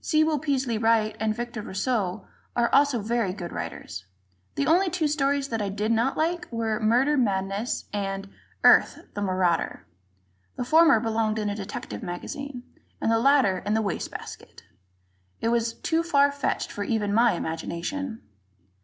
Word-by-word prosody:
Sewell 310 Hz, -1 st, +2 dB
Peaslee 260 Hz, -6 st, -1 dB
Wright 225 Hz, -1 st, +2 dB
and 215 Hz, 0 st, 0 dB
Victor 240 Hz, -1 st, -5 dB
Rousseau 200 Hz, -2 st, -2 dB, 0.3 s
are 240 Hz, 0 st, +1 dB
also 275 Hz, -5 st, +4 dB
very 225 Hz, -4 st, 0 dB
good 175 Hz, -3 st, -6 dB
writers. 95 Hz, 0 st, -6 dB, 0.5 s
The 140 Hz, -, 0 dB
only 365 Hz, +3 st, +3 dB
two 335 Hz, -3 st, 0 dB
stories 280 Hz, -1 st, 0 dB
that 225 Hz, -2 st, -2 dB
I 200 Hz, -, -1 dB
did 210 Hz, +3 st, -1 dB
not 230 Hz, +4 st, +1 dB
like 345 Hz, +1 st, -1 dB
were 225 Hz, -2 st, -1 dB
"Murder 250 Hz, +7 st, +3 dB
Madness" 200 Hz, -1 st, -1 dB
and 195 Hz, -1 st, -3 dB, 0.4 s
"Earth, -, -, +6 dB, 0.2 s
the 205 Hz, -, -4 dB
Marauder." 185 Hz, -3 st, 0 dB, 0.7 s
The -, -, -3 dB
former 320 Hz, -3 st, +6 dB
belonged 220 Hz, -1 st, 0 dB
in 210 Hz, -1 st, -1 dB
a -, -, -3 dB
detective 195 Hz, -, -6 dB
magazine, 245 Hz, +9 st, -6 dB, 0.4 s
and 225 Hz, -, +1 dB
the 225 Hz, -, +3 dB
latter 260 Hz, -8 st, +4 dB
in 205 Hz, +3 st, -1 dB
the 220 Hz, -, +2 dB
waste 200 Hz, -4 st, -2 dB
basket. -, -, -10 dB, 0.8 s
It 225 Hz, -, 0 dB
was 230 Hz, -1 st, +1 dB
too 325 Hz, 0 st, 0 dB
far 285 Hz, -4 st, +3 dB
fetched 285 Hz, +1 st, -2 dB
for 205 Hz, -, -4 dB
even 205 Hz, -1 st, -1 dB
my 235 Hz, +2 st, +4 dB
imagination. 180 Hz, -, -4 dB
225 Hz, 160 wpm, -26 LUFS, 205-275 Hz, 0.8 s, Earth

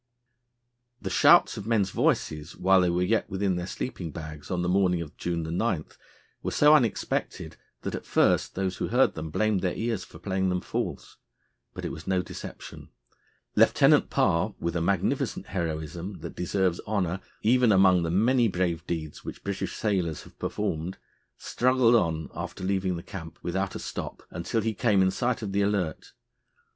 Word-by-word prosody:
The -, -, -5 dB
shouts -, -, +6 dB
of 105 Hz, -, -6 dB
men's 105 Hz, -5 st, +2 dB
voices 75 Hz, +2 st, 0 dB
while 95 Hz, 0 st, +4 dB
they 90 Hz, -, +2 dB
were 90 Hz, +1 st, +1 dB
yet 110 Hz, +5 st, +1 dB
within 95 Hz, -1 st, 0 dB
their 90 Hz, 0 st, -3 dB
sleeping 95 Hz, -6 st, -5 dB
bags 75 Hz, -1 st, -8 dB
on 90 Hz, -1 st, -1 dB
the -, -, 0 dB
morning 90 Hz, -1 st, +2 dB
of 80 Hz, -3 st, -7 dB
June 85 Hz, -1 st, -2 dB
9 85 Hz, +1 st, -1 dB, 0.6 s
were -, -, -2 dB
so 150 Hz, +1 st, +5 dB
unexpected, 125 Hz, -8 st, 0 dB, 0.3 s
that, -, -, -3 dB
at -, -, -6 dB
first, -, -, +2 dB
those 95 Hz, -1 st, -2 dB
who -, -, -2 dB
heard 125 Hz, +3 st, +3 dB
them 80 Hz, 0 st, -5 dB
blamed 105 Hz, +3 st, +1 dB
their 90 Hz, -1 st, -1 dB
ears 115 Hz, -5 st, -2 dB
for -, -, -13 dB
playing 95 Hz, +2 st, -1 dB
them 90 Hz, 0 st, 0 dB
false. -, -, -4 dB, 0.6 s
But -, -, -5 dB
it -, -, -3 dB
was 80 Hz, -, -9 dB
no 95 Hz, -1 st, +1 dB
deception. -, -, -9 dB, 0.7 s
Lieutenant -, -, +5 dB
Parr, 90 Hz, +6 st, +1 dB
with 85 Hz, 0 st, -2 dB
a 85 Hz, -, 0 dB
magnificent 95 Hz, +2 st, 0 dB
heroism 85 Hz, +1 st, -4 dB
that 85 Hz, -, -7 dB
deserves 90 Hz, 0 st, 0 dB
honour 95 Hz, -4 st, 0 dB, 0.2 s
even 120 Hz, +1 st, +4 dB
among 95 Hz, -2 st, +5 dB
the 85 Hz, -, -1 dB
many 115 Hz, +7 st, +3 dB
brave 90 Hz, -3 st, -1 dB
deeds 80 Hz, -3 st, -4 dB
which -, -, -8 dB
British 100 Hz, -1 st, -3 dB
sailors 90 Hz, -7 st, -1 dB
have -, -, -18 dB
performed, 80 Hz, +4 st, -3 dB, 0.4 s
struggled 125 Hz, -1 st, +2 dB
on 80 Hz, -8 st, +2 dB
after -, -, -6 dB
leaving 95 Hz, -1 st, 0 dB
the 85 Hz, -, -6 dB
camp 80 Hz, -4 st, -8 dB
without 95 Hz, +2 st, -2 dB
a -, -, -4 dB
stop -, -, -6 dB
until 85 Hz, +7 st, -2 dB
he 110 Hz, +1 st, -1 dB
came 105 Hz, -3 st, +3 dB
in 95 Hz, -, +3 dB
sight 120 Hz, +2 st, -1 dB
of 100 Hz, -, -3 dB
the 100 Hz, +1 st, +1 dB
Alert. 100 Hz, -6 st, -1 dB
95 Hz, 175 wpm, -27 LUFS, 85-105 Hz, 0.7 s, shouts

